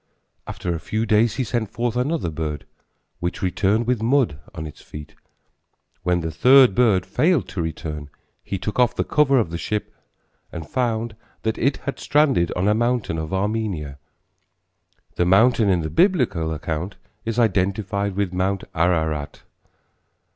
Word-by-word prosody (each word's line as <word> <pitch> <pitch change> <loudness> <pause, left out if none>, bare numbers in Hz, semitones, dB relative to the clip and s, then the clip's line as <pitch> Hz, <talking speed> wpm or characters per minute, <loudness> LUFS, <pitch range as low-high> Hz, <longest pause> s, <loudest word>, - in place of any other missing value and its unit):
After 90 - -3
a 85 - -3
few 110 +6 -2
days 110 0 +3
he 130 - 0
sent 115 -2 -2
forth 120 +1 -2
another 125 - -1
bird, 75 -2 -4 0.5
which 85 +2 -3
returned 100 +5 +1
with 125 -2 0
mud 120 - +2 0.2
on 80 - -5
its 75 - -10
feet. 75 -1 -10 0.9
When 90 0 +1
the 80 0 -3
third 130 - +6
bird 105 -6 +3
failed 170 -3 +1
to 90 - -3
return, 75 -2 -5 0.3
he 100 - -3
took 105 +5 -4
off 125 -1 +3
the - - 0
cover 140 -2 +3
of 105 -9 +1
the 85 - -4
ship 105 +1 -3 0.6
and 80 -3 -7
found 115 -3 -1 0.3
that 110 0 -1
it 135 +3 +1
had 140 - -3
stranded 140 - +2
on 90 +3 0
a 105 - +4
mountain 120 -6 0
of 80 0 -5
Armenia. 95 -8 -2 1.2
The 90 - +2
mountain 110 +3 +4
in 90 -3 +2
the 80 - -3
Biblical 125 - +2
account 80 +4 -4 0.3
is 115 0 -3
identified 100 -2 0
with 100 -2 -1
Mount 95 +1 -1
Ararat. 80 -4 0
100 Hz, 155 wpm, -22 LUFS, 85-120 Hz, 1.2 s, third